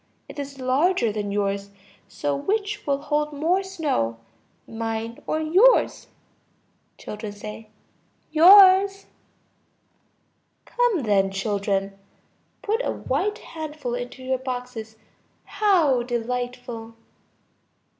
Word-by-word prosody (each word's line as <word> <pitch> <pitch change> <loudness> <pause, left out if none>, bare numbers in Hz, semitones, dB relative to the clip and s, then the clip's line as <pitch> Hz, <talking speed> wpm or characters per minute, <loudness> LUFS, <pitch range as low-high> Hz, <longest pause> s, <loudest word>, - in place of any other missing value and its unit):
It - - -10
is 280 -1 -6
larger 260 - +2
than 205 -1 -4
yours; 200 0 -1 0.4
so 145 -1 -2
which 415 - -2
will 280 -1 +2
hold 300 0 0
more 330 +6 +1
snow, 300 - -2 0.5
mine 225 0 -4
or 310 - 0
yours? 370 +11 +3 0.9
Children. 210 +1 -8 0.6
Yours. 385 +4 +7 1.6
Come 485 - +1
then, 200 -3 +2
children. 195 0 -2 0.6
Put 440 +4 0
a - - -1
white 420 +2 -2 0.2
handful 305 -6 -5
into 245 +1 -6
your 260 0 -1
boxes. 250 -4 -6 0.5
How 335 - +2
delightful! 240 -1 -4
255 Hz, 95 wpm, -24 LUFS, 220-335 Hz, 1.6 s, Yours